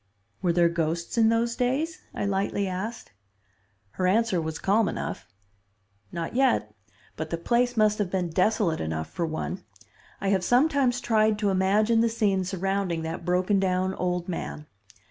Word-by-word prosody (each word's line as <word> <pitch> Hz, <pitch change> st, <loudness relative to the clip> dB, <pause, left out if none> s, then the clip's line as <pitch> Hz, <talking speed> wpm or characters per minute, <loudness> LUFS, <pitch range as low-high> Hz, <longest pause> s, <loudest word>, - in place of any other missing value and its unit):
"Were 180 Hz, -3 st, +2 dB
there 170 Hz, 0 st, +4 dB
ghosts 170 Hz, 0 st, -2 dB
in 225 Hz, -1 st, +4 dB
those 230 Hz, +1 st, +1 dB
days?" 270 Hz, +6 st, -1 dB
I -, -, -3 dB
lightly 200 Hz, 0 st, 0 dB
asked. 190 Hz, +6 st, -5 dB, 0.8 s
Her 185 Hz, -, -1 dB
answer 210 Hz, -2 st, +2 dB
was 160 Hz, 0 st, -4 dB
calm 205 Hz, +5 st, +2 dB
enough. -, -, -5 dB, 0.8 s
"Not 165 Hz, -1 st, -4 dB
yet, 245 Hz, -, +2 dB, 0.4 s
but 160 Hz, 0 st, -5 dB
the 170 Hz, -, -2 dB
place 240 Hz, +6 st, +1 dB
must 215 Hz, -1 st, +3 dB
have 205 Hz, -3 st, 0 dB
been 180 Hz, -2 st, -1 dB
desolate 185 Hz, -1 st, +1 dB
enough 80 Hz, 0 st, -3 dB
for 170 Hz, -, -2 dB
one. 160 Hz, +4 st, -4 dB, 0.6 s
I 195 Hz, -, -1 dB
have 190 Hz, -2 st, +2 dB
sometimes 255 Hz, -, +2 dB
tried 215 Hz, -2 st, +2 dB
to 205 Hz, -2 st, +1 dB
imagine 210 Hz, +4 st, +3 dB
the 230 Hz, -, +3 dB
scene 205 Hz, -4 st, +1 dB
surrounding 190 Hz, -2 st, -1 dB
that 165 Hz, +2 st, -5 dB
broken 185 Hz, +3 st, +2 dB
down 185 Hz, 0 st, 0 dB
old 180 Hz, -1 st, -2 dB
man. 165 Hz, -4 st, -5 dB
195 Hz, 160 wpm, -26 LUFS, 175-225 Hz, 0.8 s, there